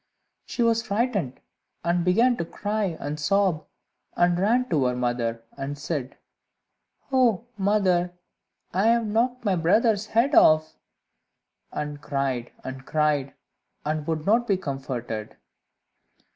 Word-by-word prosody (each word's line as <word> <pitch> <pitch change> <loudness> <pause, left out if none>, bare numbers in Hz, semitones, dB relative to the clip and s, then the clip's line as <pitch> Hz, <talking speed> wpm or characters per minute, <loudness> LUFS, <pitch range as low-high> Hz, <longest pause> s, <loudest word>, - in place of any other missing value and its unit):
She 240 - -1
was 230 0 +3
frightened, 200 - -1 0.4
and 170 0 +1
began 230 +8 +4
to - - -1
cry 205 0 -2
and 150 +1 -4
sob, 185 0 +1 0.5
and 175 0 +3
ran 240 +6 +2
to 145 -6 +2
her 125 0 +1
mother, 120 -2 -1
and 140 +1 -5
said, 145 -3 -4 0.9
"Oh, 240 -5 +3
mother, 190 -3 +2 0.6
I 195 +5 +2
have 230 0 +3
knocked 235 +3 0
my 195 -2 +2
brother's 210 +5 +2
head 235 +7 +2
off!" 155 - +5 1.0
and 150 -1 -5
cried 135 -4 -2
and 130 0 -7
cried, 150 -2 0 0.5
and 155 0 -2
would 160 -1 -2
not 230 +4 +3
be 195 - +2
comforted. 130 - -5
175 Hz, 125 wpm, -25 LUFS, 145-215 Hz, 1.0 s, off